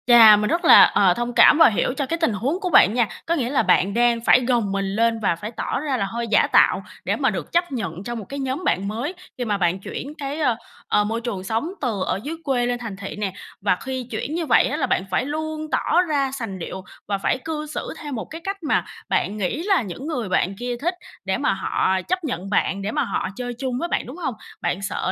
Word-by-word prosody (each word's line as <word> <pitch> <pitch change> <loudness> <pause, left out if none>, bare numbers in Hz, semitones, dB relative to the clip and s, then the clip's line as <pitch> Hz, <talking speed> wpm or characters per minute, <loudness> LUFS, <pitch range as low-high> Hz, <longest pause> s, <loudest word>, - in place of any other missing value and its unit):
Chà! 230 -3 +9
Mình 210 0 0
rất 340 +2 0
là, - - +10
ờ, 190 -3 +4
thông 240 +4 -3
cảm 300 - +7
và 325 - +8
hiểu 225 +3 0
cho 285 - 0
cái 330 +5 -2
tình 320 -9 +1
huống 265 - -1
của 375 -3 -2
bạn 210 - +6
nha, 240 -2 +2 0.2
có 335 - +1
nghĩa 250 -7 -1
là 275 - +2
bạn 195 +2 +3
đang 240 0 +3
phải 250 - +5
gồng 235 -5 +1
mình 195 0 -1
lên 230 0 +2
và 195 -5 +1
phải 210 +6 -7
tỏ 240 - -3
ra 280 -2 -1
là 200 - 0
hơi 235 +4 -4
giả 210 -1 +3
tạo - - +4 0.2
để - - +1
mà - - +1
được - - -5
chấp 345 -1 +1
nhận 195 -8 -4
trong 240 +1 -4
một 210 - -8
cái 280 - -5
nhóm 265 +5 -3
bạn 195 - 0
mới 235 - -3 0.2
khi 245 - -2
mà 210 -3 0
bạn 180 0 +1
chuyển 275 +8 -6
cái, 285 0 -5
ơ, 255 -7 +2 0.3
ờ, 210 - +3
môi 225 +3 -2
trường 210 -6 -4
sống 225 - -2
từ 225 -8 -1
ở - - -1
dưới 310 +3 -4
quê 255 -4 +1
lên 245 0 -1
thành 225 -5 -6
thị 200 -1 -7
nè. 205 -3 -3 0.3
Và 195 -2 +2
khi 260 +3 -5
chuyển 255 +7 -3
như 335 -1 -1
vậy - - +4
á 295 - -2
là 310 - +1
bạn - - +1
phải 220 - +1
luôn 310 +1 -4
tỏ 350 - +2
ra 290 -6 0
sành 230 -8 -5
điệu 185 +2 -6 0.2
và 200 -1 0
phải 195 - 0
cư 310 -1 -3
xử 305 - -5
theo 295 -2 -7
một 225 - -4
cái 325 +1 -9
cách 390 -2 -5
mà 300 - +1 0.2
bạn 210 - 0
nghĩ 215 - -2
là 390 -2 +3
những 230 - -7
người 245 - -3
bạn 190 +1 +1
kia 245 +3 -4
thích 350 +4 0 0.3
để - - 0
mà - - +1
họ 190 0 0
chấp 365 - -2
nhận 195 - -4
bạn, 200 -1 0
để 200 +2 -3
mà 295 -1 0
họ 240 - -2
chơi 245 +1 -4
chung 260 -2 -2
với 340 - -2
bạn, - - -1
đúng 255 +7 -9
hông? 295 -8 -3 0.3
Bạn 190 - -1
sợ 190 -1 -2
245 Hz, 265 wpm, -22 LUFS, 205-295 Hz, 0.3 s, là